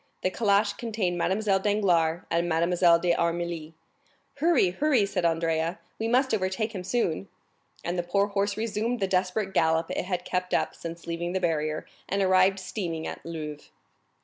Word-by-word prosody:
The 185 - +1
calash 205 0 +2
contained 210 -7 -2
Mademoiselle 195 +2 +1
Danglars 180 -5 +2
and 170 +1 +1
Mademoiselle 170 +1 +4
d'Armilly. 170 -2 -1 0.6
"Hurry, 290 - +3
hurry!" 260 +1 +2
said 185 -3 -1
Andrea, 165 +1 0 0.2
"we 225 - -1
must 255 +2 +2
overtake 205 +2 -1
him 185 -3 -5
soon." 190 -3 -1 0.6
And 175 +1 -2
the 175 0 -4
poor 200 +2 +3
horse 200 0 -1
resumed 225 +2 -1
the 195 - +1
desperate 190 +1 0
gallop 160 0 +2
it - - -2
had 180 -1 -3
kept 180 0 -1
up - - 0
since 170 0 -8
leaving 170 +1 -3
the 190 - +1
barrier, 155 -3 -1 0.2
and 200 - 0
arrived 185 +1 +4
steaming 170 -5 -4
at - - -6
Louvres. 155 -3 -7
185 Hz, 160 wpm, -27 LUFS, 170-205 Hz, 0.6 s, Mademoiselle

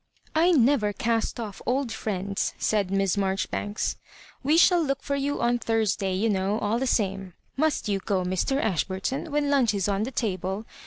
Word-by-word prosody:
" - - -32
I - - +5
never 250 -8 +3
cast 230 +3 -1
off 210 -4 -6
old 260 0 0
friends/' 200 -1 -2
said 205 -4 0
Miss 195 0 +1
Mar 190 -1 +1
joribanks. 205 +2 -2 0.2
" - - -23
"We 300 +4 +3
shall 350 0 +6
look 275 -3 -1
for 280 - -1
you 280 +1 -1
on 240 0 +2
Thursday, 215 -4 0
you 210 +5 +1
know, 200 0 0
all 220 +2 0
the 265 - -1
same. 195 -5 -1 0.2
Must 310 -3 0
you 200 -2 0
go, 190 -1 -1
Mr. 185 +9 0
Ash 190 - +1
burton 190 +8 -3
9 320 - -10
when 290 -1 +1
lunch 250 -7 +3
is 195 -1 0
on 200 0 0
the 225 - -1
table? 195 -4 -2
215 Hz, 205 wpm, -26 LUFS, 195-265 Hz, 0.2 s, shall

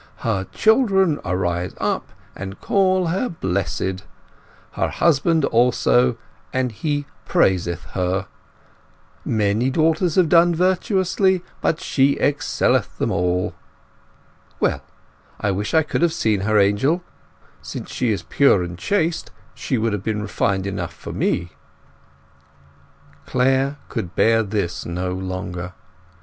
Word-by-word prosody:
'Her 100 -5 -1
children 195 - +3
arise 90 -1 -2
up - - -2 0.2
and 95 +1 -7
call 185 -2 +2
her 190 +9 -1
blessed; 95 - -2 0.7
her - - -1
husband 165 -1 +2
also, 125 0 +3 0.3
and 130 -1 0
he 145 +5 -2 0.2
praiseth 85 -2 +1
her. 95 +1 -1 1.0
Many 110 +3 +1
daughters 160 +3 +1
have 185 -3 +4
done 170 +1 +5
virtuously, 185 +1 +1 0.2
but 160 - +1
she 140 -6 +2
excelleth 145 0 +1
them - - -1
all.' 90 +1 0 1.1
Well, - - +1 0.6
I 100 - 0
wish 105 - -2
I 160 - +5
could 155 - -2
have 170 -2 +3
seen 110 -9 +1
her, 110 +2 +2
Angel. 105 - +2 0.6
Since - - -7
she 120 -3 0
is 105 - -2
pure 135 -10 +3
and 85 0 -7
chaste, 170 - 0 0.2
she 130 +1 -2
would 110 -1 0
have 105 - -2
been 105 -1 -2
refined 95 -3 -1
enough 100 - -4
for - - -8
me." 90 0 0 1.8
Clare 135 +2 +1
could 105 -5 -5
bear 115 0 +4
this 100 -4 -2
no 90 +1 -3
longer. 90 -1 -5
115 Hz, 125 wpm, -21 LUFS, -, 1.8 s, done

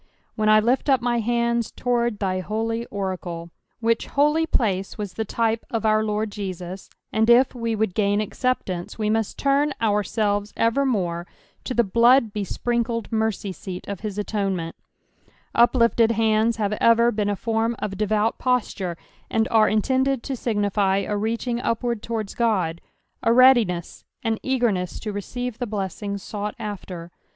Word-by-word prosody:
" - - -42
When 215 0 +1
I 215 0 +7
l{fl 245 +6 +1
up 265 -2 +5
my 240 -1 0
hande 235 0 0
toaard 240 -3 0
thy 185 -2 -1
holy 225 +4 -2
orade 190 -2 -2
:'■' 170 -1 -7 0.3
which 230 0 +1
holy 300 +3 +2
place 195 -9 0
was 205 -3 -5
the 220 - -3
type 225 +1 0
of 225 -2 -2
our 215 0 +3
Lord 210 0 -1
Jesus; 185 -2 -6 0.2
and 220 +1 +2
if 245 +2 +6
we 230 -2 -2
would 215 -3 0
gain 205 0 +2
acceptance, 210 -5 -2
wc 215 -1 0
must 220 -1 -1
turn 280 +1 +2
ourselves 205 -1 0
evermore 220 -9 +1 0.4
to 255 - -3
the 235 - +4
blood 235 +2 +4
bespriokled 230 +3 -2
mercy 220 -3 -1
seat 185 0 -7
ol 200 - -3
his 210 +1 -6
atone 205 -2 -1
ment 165 -1 -5 0.8
Uplifted 235 -1 +4
hands 220 0 +2
have 210 -1 0
ever 230 +1 +5
beeo 205 -2 0
a - - -2
form 225 +2 -1
of 200 -2 -4
devout 215 +2 0
posture, 205 -8 -1 0.3
and 220 0 +1
are 220 -1 +4
in 215 0 +2
tended 265 -1 +1
to 270 - -3
signify 205 -4 +1
a 210 - -1
reaching 230 +3 -1
upwaM 235 -1 -1
towards 220 -4 -4
God, 185 -8 0 0.4
a 230 - +2
readiness, 235 -9 +4 0.2
an 225 -1 0
eagerness 235 -9 0
to 210 -2 -4
receive 245 +4 -5
the 245 - -2
blessing 200 0 -3
sought 205 +1 -5
after. 185 -5 -7
220 Hz, 160 wpm, -23 LUFS, 200-235 Hz, 0.8 s, I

